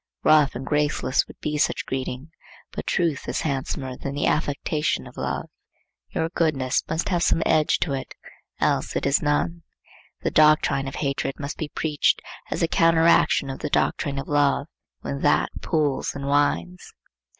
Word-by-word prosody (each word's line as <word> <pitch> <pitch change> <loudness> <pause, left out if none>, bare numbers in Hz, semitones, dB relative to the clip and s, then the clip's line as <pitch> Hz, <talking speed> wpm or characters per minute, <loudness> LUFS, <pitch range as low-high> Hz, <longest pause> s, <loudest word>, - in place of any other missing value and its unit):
Rough 150 -4 +5
and 130 +2 -5
graceless 145 -3 +1
would - - -14
be 150 0 -2
such - - +1
greeting, 130 +3 -4 0.4
but - - -6
truth 165 -5 0
is - - -1
handsomer 135 -2 -3
than 140 +1 -5
the 145 - 0
affectation 150 0 0
of - - -13
love. - - -3 0.6
Your 160 - -1
goodness 145 -7 +1
must 160 +1 -1
have 175 -3 +1
some 165 -1 +2
edge 155 -1 +3
to 145 - 0
it,—else 135 -1 -3
it - - -1
is 140 0 +3
none. 160 +3 0 0.6
The - - 0
doctrine 150 -3 +4
of 135 - -6
hatred 140 -1 -2
must 145 +1 -5
be 155 - -3
preached, 150 0 +1 0.3
as - - -2
the 165 - +3
counteraction 165 -4 +3
of 135 - -7
the 150 - -3
doctrine 140 -1 0
of 135 - -4
love, 145 -1 +2 0.4
when 70 0 -4
that - - +2
pules 150 -4 0
and 140 0 -5
whines. 90 - 0
145 Hz, 160 wpm, -24 LUFS, 135-155 Hz, 0.6 s, Rough